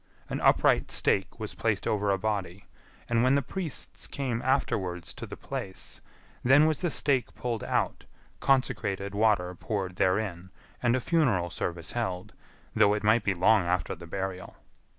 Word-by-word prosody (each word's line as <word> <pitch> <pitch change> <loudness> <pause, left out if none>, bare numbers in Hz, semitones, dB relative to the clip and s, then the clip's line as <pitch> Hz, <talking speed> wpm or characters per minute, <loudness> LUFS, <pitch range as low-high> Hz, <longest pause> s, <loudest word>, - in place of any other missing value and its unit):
An - - -2
upright - - +4
stake 95 +4 +1
was 110 -1 -4
placed 105 -4 -1
over 105 -1 0
a 100 - +3
body, 100 -2 -3 0.4
and 115 -1 +2
when 130 +2 +4
the 140 - +1
priests 170 +1 -4
came 125 -4 -3
afterwards 95 - 0
to - - -8
the - - -8
place, 95 -1 -5 0.4
then 135 +4 +6
was 155 -2 +1
the 175 - 0
stake 140 -4 +1
pulled 120 -3 -3
out, - - -1 0.3
consecrated 100 -7 0
water 100 -4 +2
poured 95 -1 -4
therein, 95 -2 0 0.3
and 120 0 +3
a - - +1
funeral 120 - +1
service 85 -2 -3
held, 105 -4 -3 0.4
though 105 +1 +5
it 105 - -4
might 110 +1 +4
be 100 -2 0
long 100 +4 +4
after 90 +1 0
the 85 - -10
burial. 95 +1 -5
105 Hz, 160 wpm, -28 LUFS, 95-120 Hz, 0.4 s, then